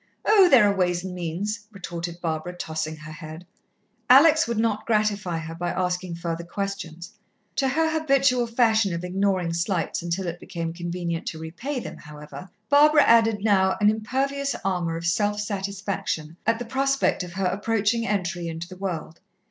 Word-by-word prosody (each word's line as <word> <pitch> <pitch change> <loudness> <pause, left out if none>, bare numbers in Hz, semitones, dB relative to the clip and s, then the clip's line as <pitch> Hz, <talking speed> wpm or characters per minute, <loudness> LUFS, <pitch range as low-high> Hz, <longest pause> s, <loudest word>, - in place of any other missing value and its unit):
"Oh, 405 -4 +6
there 245 -8 +7
are 200 - +1
ways 180 -2 +1
and 185 -1 -5
means," 195 +5 -4
retorted 175 -3 -6
Barbara, 160 +1 -3
tossing 160 -1 -3
her 155 0 -10
head. 155 +2 -9 0.6
Alex 310 +5 +7
would 235 -1 -2
not 220 -1 0
gratify 210 -5 +1
her 160 0 -6
by 175 +1 -3
asking 180 -1 -2
further 170 0 -4
questions. 180 -1 -5 0.4
To 270 - +2
her 320 +5 +2
habitual 275 -5 +2
fashion 225 -5 +2
of 170 - -5
ignoring 185 -2 0
slights 170 +1 -1
until 175 +2 -2
it 170 0 -4
became 165 -2 -5
convenient 170 -1 -4
to 160 - -4
repay 230 - -4
them, - - -7
however, 150 +5 -11 0.2
Barbara 295 +1 +6
added 225 -3 +4
now 190 -3 +3
an 210 0 +5
impervious 270 +5 -1
armour 175 -4 -1
of 165 - -6
self 205 +4 +1
satisfaction 195 -5 -3
at 230 0 +3
the 245 - -5
prospect 270 +1 +1
of 180 -1 -7
her 190 +1 -2
approaching 220 +4 0
entry 180 -4 -1
into 165 +1 -5
the 185 0 -11
world. 170 -4 -5
190 Hz, 165 wpm, -25 LUFS, 170-225 Hz, 0.6 s, there